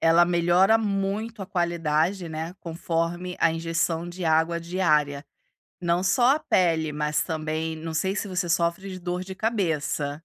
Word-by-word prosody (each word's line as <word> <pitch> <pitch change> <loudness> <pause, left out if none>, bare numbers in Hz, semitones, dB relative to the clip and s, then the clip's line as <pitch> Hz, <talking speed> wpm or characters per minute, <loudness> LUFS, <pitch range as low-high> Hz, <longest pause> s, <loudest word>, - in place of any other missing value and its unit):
ela 165 +1 +5
melhora 175 +5 +4
muito 205 +1 -2
a - - -6
qualidade, 170 0 0
né, 160 +3 -5
conforme 170 +1 -3
a 165 - +4
injeção 165 +1 -1
de 175 +1 -6
água 165 +1 +2
diária. 155 -5 +1 0.6
Não 175 +1 +1
só 245 +8 +4
a - - -3
pele, 165 - +1
mas 150 0 0
também 160 0 -3
não 160 0 -6
sei 190 +5 0
se 205 - -2
você 185 -2 -2
sofre 170 +3 0
de 185 -1 -7
dor 180 +1 -3
de 190 0 -8
cabeça. 160 -10 -1
170 Hz, 160 wpm, -25 LUFS, 160-185 Hz, 0.6 s, ela